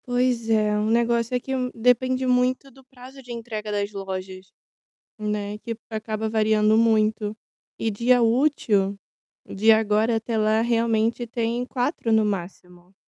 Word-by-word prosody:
Pois 245 -2 0
é, 215 -1 +2
o 210 +1 0
negócio 235 +1 +1
é - - +1
que 265 +2 -4
um 250 -1 -1
depende 255 +2 +2
muito 255 +2 +1
do 265 +2 -19
prazo 260 +1 -14
de 250 -1 -12
entrega 220 -3 -6
das 205 0 -2
lojas, 190 -1 -7 0.7
né, 210 -1 -3
que 230 +1 -5 0.2
acaba 220 0 -3
variando 215 0 +2
muito. 215 -2 +2 0.4
E 225 - -1
dia 240 +4 +2
útil, 225 -6 +1 0.5
de 215 +3 +2
agora 220 +1 +3
até 225 0 -2
lá, 215 +1 +2
realmente 230 0 0
tem 235 +1 -2
4 250 -1 -2
no 220 -1 +4
máximo. 180 -2 -6
225 Hz, 145 wpm, -24 LUFS, 210-245 Hz, 0.7 s, no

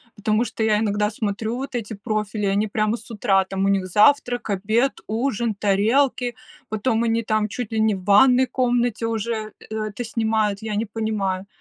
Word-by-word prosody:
потому 215 +2 +1
что 225 - -3
я 215 -1 +3
иногда 210 -1 +1
смотрю 215 +1 -3
вот 270 0 -6
эти 230 -2 -4
профили, 210 0 -3
они 200 +2 +1
прямо 215 +2 0
с 230 - -15
утра, 195 -3 +2
там 195 +1 -2
у - - +2
них 195 -2 +1
завтрак, 245 +3 +3
обед, 215 +7 0
ужин, 230 -1 -1
тарелки, 235 +5 +1 0.3
потом 220 +2 0
они 230 0 +1
там 215 -1 0
чуть 225 +1 -5
ли 220 - -1
не 220 -1 +3
в 185 - -9
ванной 250 +6 +5
комнате 240 -2 0
уже 220 -1 -3 0.2
э - - -3
это 215 +4 -5
снимают, 220 -3 0
я 220 -1 -3
не 215 +2 0
понимаю, 200 -3 -2
220 Hz, 180 wpm, -22 LUFS, 205-235 Hz, 0.3 s, ванной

